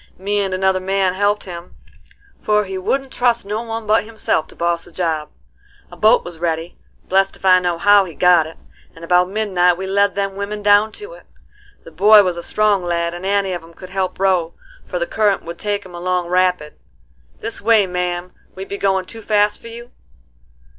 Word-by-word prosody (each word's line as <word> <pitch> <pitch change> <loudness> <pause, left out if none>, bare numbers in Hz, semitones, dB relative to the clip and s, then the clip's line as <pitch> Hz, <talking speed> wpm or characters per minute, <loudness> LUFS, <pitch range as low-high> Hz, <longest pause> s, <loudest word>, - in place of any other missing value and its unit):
Me 205 +2 -1
and 195 -1 -1
another 190 0 +1
man 190 0 0
helped 205 +2 0
him, 175 -1 -10 0.6
for 210 0 +1
he 190 -1 -6
wouldn't 265 +8 -2
trust 240 -3 +1
no 210 +2 -3
one 225 -1 -5
but 215 +1 +2
himself 215 -7 -2
to - - -16
boss 170 0 -1
the - - -14
job. 160 -4 -2 0.6
A - - -10
boat 215 +1 +4
was 175 -2 -9
ready,—blest 175 +3 -2
if - - -11
I 185 -1 +6
know 175 -2 -1
how 205 +2 +5
he 170 -4 -10
got 175 -3 +4
it,—and 165 0 -15
about 180 +1 +3
midnight 185 -4 +1
we 190 - -5
led 200 +1 +1
them 195 -1 -2
women 205 +1 -5
down 205 +1 +4
to 420 +4 -10
it. - - -16 0.6
The 165 - -13
boy 205 +6 +6
was 180 -2 -1
a 170 - -6
strong 210 0 +1
lad, 170 -1 -1
and 175 +2 -6
any 200 -1 0
of 175 - -4
'em 165 +1 -17
could 185 +2 -12
help 190 -1 -2
row, 185 -4 +1 0.3
for - - -3
the - - -1
current 210 - 0
would 170 +1 -8
take 205 -1 -2
'em 180 - -13
along 180 0 -2
rapid. 180 -4 0 0.6
This - - -5
way, 220 -1 +4
ma'am; 180 0 -3 0.2
be 190 +1 -6
we 200 - -6
goin' 190 -1 +1
too 225 +4 -10
fast 210 -1 +1
for - - -11
you?" 235 +1 -10
190 Hz, 200 wpm, -19 LUFS, 175-205 Hz, 0.6 s, I